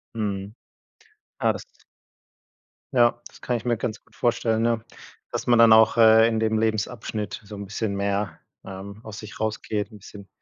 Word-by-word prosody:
Mhm. 100 -1 -3 0.9
Ja, - - +3
das - - -7 1.3
ja, 120 -1 +3
das - - -19
kann 120 -1 -1
ich 115 - -10
mir 120 -2 +1
ganz 110 -2 -4
gut - - -26
vorstellen, 115 -2 +1
ne, 115 -1 +1 0.5
dass - - -3
man 120 -1 +5
dann 115 -1 +8
auch, 110 +1 +6
äh, 110 0 +7
in 110 -1 0
dem 110 0 +1
Lebensabschnitt 110 -1 -2
so 105 +1 -10
'n 100 0 -6
bisschen 100 0 -3
mehr, 100 -4 -2 0.3
ähm, 100 +2 -8
aus 110 -1 -8
sich 105 -1 -10
rausgeht, 110 0 -2
'n 105 - -12
bisschen 100 0 -12
110 Hz, 175 wpm, -24 LUFS, 100-115 Hz, 1.3 s, dann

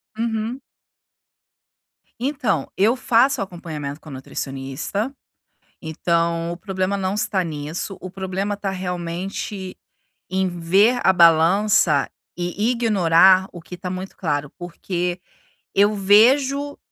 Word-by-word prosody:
Uhum. 225 +3 -3 1.6
Então, 245 - -1
eu 220 +6 +3
faço 250 0 +2
acompanhamento 155 -6 -7
com 155 - -12
a - - -9
nutricionista, 135 - -4 0.7
então 170 +1 -1
o - - -6
problema 190 0 -2
não 190 0 -2
está 205 -2 0
nisso, 160 +4 -5
o 185 - -6
problema 190 +2 -3
tá 200 0 -4
realmente 185 +1 -5 0.6
em 190 0 +1
ver 190 +8 +2
a - - +6
balança 170 -2 +4 0.3
e 180 +6 -1
ignorar 190 -5 +4
o 175 - -10
que 180 - -9
tá 180 - -5
muito 185 +1 -6
claro, 150 -4 -2
porque 175 0 -4 0.5
eu 205 +2 +4
vejo 265 +8 +3
185 Hz, 115 wpm, -21 LUFS, 170-210 Hz, 1.6 s, a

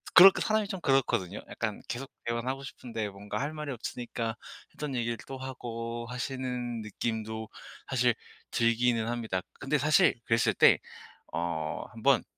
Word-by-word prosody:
그렇게 190 +1 +10
사람이 215 -1 +2
좀 190 -3 -4
그렇거든요? 120 - +2
약간 110 -3 -3
계속 135 +2 -4 0.2
대화는 115 +1 -1
하고 135 +1 -3
싶은데 115 -5 -4
뭔가 100 +1 -5
할 145 +3 -2
말이 150 -2 -4
없으니까 120 -2 -3 0.4
했던 150 -3 -4
얘기를 120 -1 0
또 135 - -5
하고 120 -3 -5
하시는 125 -2 -3
느낌도 110 0 -3 0.4
사실 125 -3 +3 0.3
들기는 115 0 +2
합니다. 115 -6 -1 0.2
근데 135 +3 +1
사실 150 +2 +5
그랬을 115 0 +3
때 - - +7 0.5
어 80 -2 -2
1 - - -10
번 - - +5
120 Hz, 315 characters per minute, -30 LUFS, 115-135 Hz, 0.5 s, 그렇게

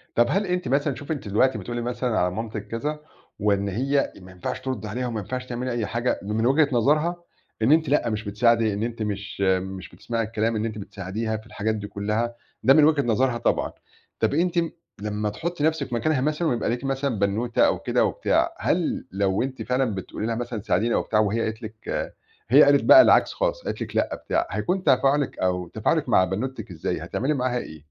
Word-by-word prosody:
طب 120 0 +5
هل 200 +2 +1
أنتِ 180 -5 -1
مثلًا، 140 +2 +1
شوفي 140 +5 -5
أنتِ 135 -8 -5
دلوقتي 120 +4 +2
بتقولي 120 +4 -4
مثلًا 120 -1 -1
على 90 - +2
مامتِك 110 +1 -5
كذا، 150 +7 -3 0.4
وإن 100 -1 +1
هي 135 +8 0
ما 90 - -13
ينفعش 90 -1 -5
تردّي 125 -6 -4
عليها 125 +4 -3
وما 115 -3 -3
ينفعش 125 +5 -5
تعملي 125 +1 -3
أي 120 -3 -1
حاجة، 120 +3 -1
م 100 +2 -4
من 110 +1 +1
وجهة 145 +3 +4
نظرها، 150 +8 +2 0.5
إن 125 - +4
أنتِ 160 0 +4
لأ 145 -4 +2
مش 110 0 -3
بتساعدي 115 +1 +2
إن 100 - -3
أنتِ 115 -1 -3
مش 100 -2 -4 0.2
مش 95 0 -7
بتسمعي 115 -1 -3
الكلام 110 +1 -1
إن 110 - -1
أنتِ 110 -1 -4
بتساعديها 105 +3 -4
في 110 0 -11
الحاجات 110 0 -2
دي 105 -1 -5
كلّها، 105 +4 -2 0.3
ده 135 - +6
من 155 -1 +6
وجهة 155 -2 +4
نظرها 120 +1 +1
طبعًا، - - 0 0.5
طب - - +2
أنتِ 175 +2 +1
م 170 -1 +1 0.3
لمّا 105 0 -2
تحطّي 150 +9 -3
نفْسِك 155 -5 0
مكانها 135 +3 +1
مثلًا 155 +4 0
ويبقى 120 - 0
ليكِ 125 +3 -3
مثلًا 135 -3 -1
بنوتة 105 +4 +2
أو - - +1
كده - - +1
وبتاع، - - +1
هل - - 0
لو 95 +1 +1
أنتِ 130 -3 -4
فعلًا 125 0 0
بتقولي 95 +3 -5
لها 115 - -1
مثلًا 120 -1 -4
ساعديني 115 +1 +1
أو - - +2
بتاع 110 - 0
وهي 110 +2 +1
قالت 110 +1 -3
لِك 110 0 -7 0.8
هي 140 +5 +8
قالت 140 0 +5
بقى 325 - +10
العكس - - +4
خالص - - -1
قالت - - -4
لِك - - -6
لأ - - +1
بتاع، - - -1
هيكون 185 +1 -1
تفاعلِك 140 +1 +2
أو 90 -1 -1
تفاعلِك - - 0
مع 95 - +5
بنوتِك 110 +2 -4
إزاي، 85 - -3
هتعملي 145 +5 -1
معاها 125 -2 0
إيه؟ 80 -9 -8
120 Hz, 210 wpm, -24 LUFS, 105-135 Hz, 0.8 s, بقى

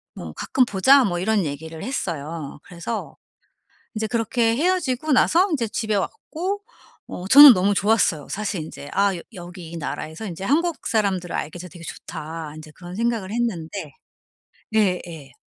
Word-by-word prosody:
뭐 - - -8
"가끔 255 -2 +1
보자." 260 +7 +5
뭐 175 -3 -1
이런 200 -1 +1
얘기를 160 +3 -6
했어요. 160 - -4
그래서 180 +6 -6 0.8
인제 220 0 -1
그렇게 230 0 +1
헤어지고 310 -4 0
나서 350 +8 +4
인제 245 -9 0
집에 215 -2 -1
왔고 385 - -3 0.5
어 180 - -6
저는 280 -1 +11
너무 195 +3 +2
좋았어요. 195 -8 +2
사실 200 -5 -2
인제 145 -2 -9
'아 200 -2 +2
여 - - -7
여기 175 -2 -9
이 170 - -6
나라에서 160 +6 -5
인제 185 +1 -6
한국 320 - 0
사람들을 195 -5 0
알게 155 +4 -4
돼서 180 +1 -8
되게 170 -2 -11
좋다.' 155 0 -7
인제 155 0 -11
그런 175 +2 -10
생각을 225 -4 -1
했는데 200 -6 -3 0.8
예 195 -5 +3
예. 150 -5 -10
195 Hz, 325 characters per minute, -23 LUFS, 170-235 Hz, 0.8 s, 저는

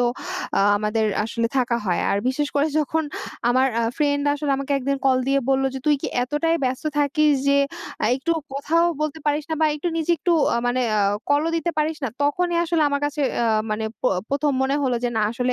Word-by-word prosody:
তো - - +3 0.5
আ - - +4 0.2
আমাদের 215 +1 0 0.2
আসলে 230 +1 -1
থাকা 245 -2 +1
হয়। 175 -2 +1
আর 200 - +1
বিশেষ 290 +3 -1
করে 285 +1 +3
যখন 315 +2 0 0.5
আমার 255 +2 +3
আ - - +1
ফ্রেন্ড 285 -2 +1
আসলে 290 0 -2
আমাকে 275 +1 -3
একদিন 275 +1 -1
কল 260 -1 +4
দিয়ে 275 0 +3
বললো 270 0 +2
যে, - - -3
"তুই 300 - +5
কি - - -1
এতটাই 295 +6 0
ব্যস্ত 255 +3 -2
থাকিস 295 +1 +3 0.2
যে 280 - +4 0.5
আ - - +2
একটুও 325 +5 -1
কথাও 330 +5 +1 0.2
বলতে 305 +1 -2
পারিস 295 0 +1
না - - +1
বা 315 - +5
একটু, 300 +4 -3
নিজে 330 +1 +1
একটু 345 +4 +1 0.2
আ - - +1
মানে 245 +1 +1 0.2
আ - - +3 0.3
কলও 290 +3 +3
দিতে 340 +1 -1
পারিস 310 +1 0
না?" - - 0
তখনই 340 +4 +1
আসলে 335 -2 +1
আমার 285 0 -1
কাছে 290 +1 -2 0.2
আ - - +2 0.3
মানে 215 +1 -1 0.2
প - - -17 0.2
১ম 285 +1 +1
মনে 270 +1 +1
হলো 255 -3 +1
যে, - - +2
না, 220 - +2
আসলে 250 +1 -1
285 Hz, 215 wpm, -22 LUFS, 255-305 Hz, 0.5 s, তুই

